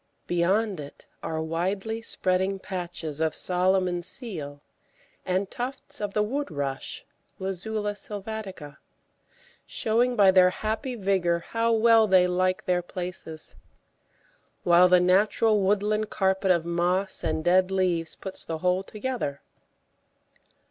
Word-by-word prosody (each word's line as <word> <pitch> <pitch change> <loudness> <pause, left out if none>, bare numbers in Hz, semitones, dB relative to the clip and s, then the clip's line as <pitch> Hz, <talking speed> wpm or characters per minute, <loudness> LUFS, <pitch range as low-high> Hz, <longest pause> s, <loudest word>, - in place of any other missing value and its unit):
Beyond 190 +3 +1
it 145 -1 -10 0.2
are 160 0 -3
widely 195 +7 -2
spreading 190 -2 0
patches 175 -5 -5
of 160 -1 +1
Solomon's 180 -1 +1
Seal 155 - -6 0.7
and 185 +2 0
tufts 255 0 -5
of 205 -1 -3
the 210 - +3
Wood 275 +6 -2
rush 140 -3 -4 0.3
(Luzula 205 +3 -3
sylvatica), 200 -6 -6 0.9
showing 240 +3 +1
by 200 -4 +6
their 185 -1 +6
happy 220 +6 -3
vigour 185 -5 +1
how 230 0 +1
well 225 0 +5
they 185 -2 +5
like 185 +1 0
their 180 -1 +1
places, 175 -3 -6 1.1
while 175 +1 +6
the 180 0 +6
natural 205 +4 +3
woodland 210 +2 +1
carpet 190 0 0
of 170 -2 +3
moss 180 +3 0
and 160 -1 -1
dead 185 +2 +4
leaves 180 -4 +1
puts 190 -1 -6
the 165 - -4
whole 180 +3 +1
together. 210 - -4
185 Hz, 120 wpm, -26 LUFS, 175-210 Hz, 1.1 s, by